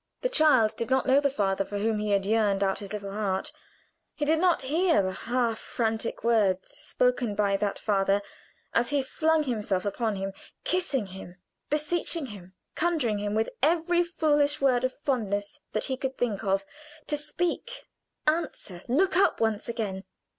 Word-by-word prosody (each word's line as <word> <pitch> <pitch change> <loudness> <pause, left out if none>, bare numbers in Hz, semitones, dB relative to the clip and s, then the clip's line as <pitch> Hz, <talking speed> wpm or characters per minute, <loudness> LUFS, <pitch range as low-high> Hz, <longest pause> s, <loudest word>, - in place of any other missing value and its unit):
The - - +1
child 295 - +5
did 230 - -3
not 265 0 +2
know 265 +1 +5
the 285 -1 +2
father 195 -7 0
for 205 +1 -5
whom 215 +1 0
he 210 0 -2
had 200 -1 +2
yearned 205 -2 +2
out 195 -1 0
his 200 -1 -8
little 200 -2 -4
heart 205 +6 -1 0.6
he 295 - -1
did 315 +2 +3
not 355 -4 +3
hear 320 - +3
the 185 - -1
half 230 +2 -1
frantic 225 -1 -2
words 205 -5 +2
spoken 250 -4 0
by 200 -1 +2
that 200 0 -1
father 200 -1 +1 0.5
as 235 +1 +2
he 285 -2 +1
flung 315 +3 +1
himself 210 -8 -1
upon 215 +1 -1
him, 195 0 -4 0.3
kissing 345 - 0
him, 190 -2 -10 0.3
beseeching 305 +1 -1
him, 190 -6 -11 0.2
conjuring 305 -11 0
him 205 0 -2
with 220 +1 0
every 340 +4 +3
foolish 295 -4 +2
word 255 -3 +3
of 255 - +1
fondness 210 -8 -2
that 215 - 0
he 265 - -1
could 265 0 -4
think 220 -5 -1
of, 195 0 +1 0.4
to 300 - -1
speak, 345 +11 -3 0.4
answer, 305 - -1
look 355 +11 +2
up 385 - +3
once 220 0 0
again. 205 -5 -3
230 Hz, 170 wpm, -27 LUFS, 205-295 Hz, 0.6 s, child